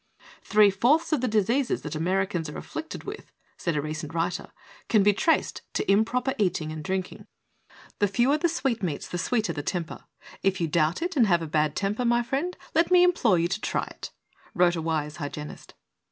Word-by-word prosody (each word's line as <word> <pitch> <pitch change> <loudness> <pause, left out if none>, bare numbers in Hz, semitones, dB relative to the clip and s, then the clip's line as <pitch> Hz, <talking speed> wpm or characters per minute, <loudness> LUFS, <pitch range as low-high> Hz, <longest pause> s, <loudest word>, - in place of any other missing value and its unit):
"Three 210 -1 +5
fourths 280 - +2
of 290 - +1
the 255 - +1
diseases 230 +5 +1
that 150 - -5
Americans 175 0 -1
are - - -7
afflicted 320 0 -7
with," - - -8 0.2
said 170 -3 -2
a 145 - -1
recent 155 +1 -5
writer, 170 +2 -2 0.4
"can 215 -3 +4
be 205 +1 +5
traced 320 +10 +1
to - - +1
improper 245 +6 +2
eating 175 -6 0
and 155 -1 -6
drinking." 185 +2 -4 0.7
"The 205 - +3
fewer 245 +9 +2
the 345 - +3
sweetmeatSj 230 - -2
the 175 - -2
sweeter 215 -6 0
the 145 - -4
temper. 170 +1 -4 0.4
If 195 0 +1
you 170 - 0
doubt 160 - +1
it 355 0 -3
and 240 -6 +4
have 175 -3 +2
a - - -4
bad 150 -1 +1
temper, 205 +5 -1
my 240 0 +2
friend, 280 +9 -2 0.2
let 330 +1 +3
me 360 -1 +6
implore 285 - +3
you 170 +1 +2
to 195 +3 -2
try - - -1
it," - - -8 0.5
wrote 175 -1 +4
a 165 - -3
wise 155 -1 -2
hygienist. 150 -1 -7
195 Hz, 195 wpm, -26 LUFS, 165-245 Hz, 0.7 s, me